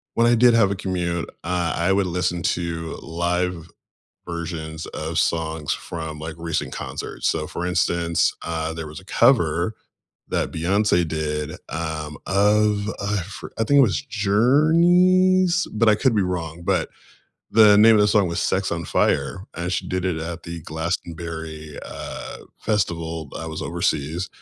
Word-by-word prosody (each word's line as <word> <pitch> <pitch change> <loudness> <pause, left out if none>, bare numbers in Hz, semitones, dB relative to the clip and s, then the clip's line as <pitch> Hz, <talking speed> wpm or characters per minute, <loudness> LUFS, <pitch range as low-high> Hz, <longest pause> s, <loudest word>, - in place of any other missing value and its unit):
when 115 0 +4
I 120 - +5
did 120 +1 +6
have 105 -4 +4
a - - 0
commute, 90 -3 -2 0.2
uh, 85 -1 -1
I 85 +3 +1
would 100 -1 +2
listen 90 0 -1
to 85 -2 -2
live 85 0 -2 0.6
versions 80 -2 -5
of - - -4
songs 80 -2 0
from, 80 -2 -6
like, 80 +1 -6
recent 85 -1 -2
concerts - - -4
so, - - -1
for 90 - -4
instance, 85 -1 +1
uh, 80 -1 -3
there 80 -1 -5
was 75 - -9
a - - -18
cover 105 - +3 0.5
that - - -1
Beyonce 90 +1 +2
did, 75 -1 -2 0.2
um, 80 -1 -4
of 105 +1 +2
I 100 +1 0
for 95 - -9
I 115 - +2
think 140 +5 +4
it - - +9
was 95 - +2
Journey's, 175 - +4
but 110 +1 +2
I 105 - +6
could 130 0 +2
be 100 - +3
wrong, 85 -2 -3
but 90 -3 0 0.6
the 105 -2 +7
name 110 +2 +8
of 105 - +5
the 105 - +4
song 105 -3 +3
was 85 - -2
Sex 95 0 0
on 85 0 -2
Fire, 95 - 0
and 85 +1 -3
she - - -2
did 95 0 -2
it 90 -3 0
at 85 +1 -5
the 85 -1 -7
Glastonbury, 80 -2 -5
uh, - - -7 0.2
Festival, 85 -6 -1
b - - -9
I 80 - -5
was 80 0 -5
overseas. 85 +1 -1
85 Hz, 165 wpm, -23 LUFS, 80-105 Hz, 0.6 s, it